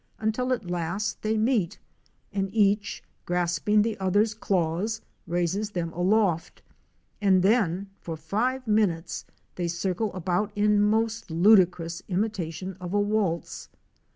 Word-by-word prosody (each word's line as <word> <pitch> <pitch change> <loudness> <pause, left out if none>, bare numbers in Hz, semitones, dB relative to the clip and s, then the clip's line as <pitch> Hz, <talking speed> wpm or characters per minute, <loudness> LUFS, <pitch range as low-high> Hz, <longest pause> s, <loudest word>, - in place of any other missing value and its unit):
17 215 - -2
until 250 +4 0
at 235 -5 -1
last 175 +4 -2
they 220 +1 0
meet, 215 -6 +1 0.6
and 195 -1 -1
each 205 -1 +2 0.2
grasping 180 +4 +2
the 225 -1 -1
other's 205 +3 +2
claws, 195 +1 -1 0.3
raises 175 +5 0
them 170 -5 -3
aloft, 180 -2 +1 0.6
and 190 -3 +4
then 200 -3 +2
for 165 -2 -6
five 235 - -1
minutes 190 -6 0 0.3
they 175 -1 -1
circle 185 +5 -1
about 185 +3 -1
in 210 0 +3
most 220 +1 +1
ludicrous 175 -1 +4
imitation 190 -2 -2
of 180 +2 -4
a - - +4
waltz. 205 -5 -1
195 Hz, 125 wpm, -26 LUFS, 175-215 Hz, 0.6 s, and